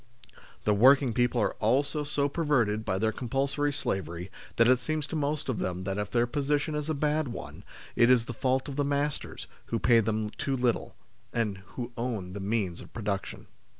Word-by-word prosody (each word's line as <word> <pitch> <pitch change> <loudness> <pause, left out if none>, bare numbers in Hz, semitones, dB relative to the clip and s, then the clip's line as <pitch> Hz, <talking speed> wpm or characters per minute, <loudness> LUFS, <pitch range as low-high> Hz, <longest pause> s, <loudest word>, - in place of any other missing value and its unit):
The 105 - +3
working 130 +3 +5
people 120 +1 +2
are - - +1
also 140 +7 +1
so 145 -1 0
perverted 130 -9 +1
by 95 -3 -1
their 110 +2 +1
compulsory 140 +5 -1
slavery 90 - -3 0.2
that 115 - +5
it 130 0 +5
seems 155 +3 -1
to 155 - -5
most 150 0 -1
of 130 -5 -1
them 90 0 -2
that 95 +1 -2
if 105 -3 -2
their 120 -1 +2
position 145 +4 0
is 150 0 -3
a 155 - 0
bad 150 +1 +1
one, 120 - -7 0.3
it 120 - +5
is 125 -2 +5
the 120 - -5
fault 130 +3 0
of 140 -1 -6
the 145 - +2
masters, 145 +1 -2 0.2
who 115 - -1
pay 115 0 +5
them 110 -1 -1
too 135 +3 -2
little, 125 -1 0 0.4
and 105 -5 -1 0.2
who 125 -1 -4
own 110 -7 -3
the 100 - -5
means 100 -3 -1
of - - -13
production. 100 -3 -4
125 Hz, 195 wpm, -29 LUFS, 105-140 Hz, 0.4 s, working